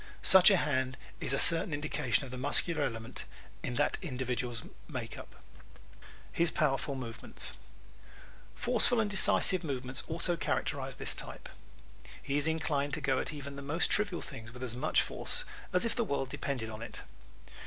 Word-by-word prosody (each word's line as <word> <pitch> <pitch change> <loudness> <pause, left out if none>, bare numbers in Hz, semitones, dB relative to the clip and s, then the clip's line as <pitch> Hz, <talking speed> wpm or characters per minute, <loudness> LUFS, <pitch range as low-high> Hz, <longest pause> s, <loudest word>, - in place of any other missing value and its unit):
Such 190 0 +8
a 195 - +5
hand 130 -4 0 0.2
is - - 0
a 135 - +3
certain 165 +1 +5
indication 135 -6 0
of 130 - -10
the 125 - -5
muscular 150 +4 +1
element 115 -2 -4 0.4
in 125 - -3
that 145 +3 +1
individual's 125 - -3 0.2
makeup. - - -7 1.0
His 170 0 +3
Powerful 140 -2 0
Movements 120 -4 +2 1.0
¶ - - -20
Forceful, 240 -1 +3
decisive 195 -2 +3
movements 130 -3 -2
also 170 +2 +1
characterize 170 - -2
this - - 0
type. - - -6 0.7
He 140 - -3
is 145 +1 +2
inclined 145 -3 0
to 155 - -6
go 135 -2 +1
at - - -2
even 140 -2 -7
the - - -6
most 150 +5 0
trivial 205 -4 +1
things 115 +1 -9
with 125 +1 -9
as 120 -2 -1
much 125 - +2
force - - -1 0.3
as 180 +5 +2
if 230 - 0
the 240 - +1
world 140 - -2
depended 130 -5 -3
on 110 +1 -8
it. 120 - -7
140 Hz, 165 wpm, -32 LUFS, 130-170 Hz, 1.0 s, Such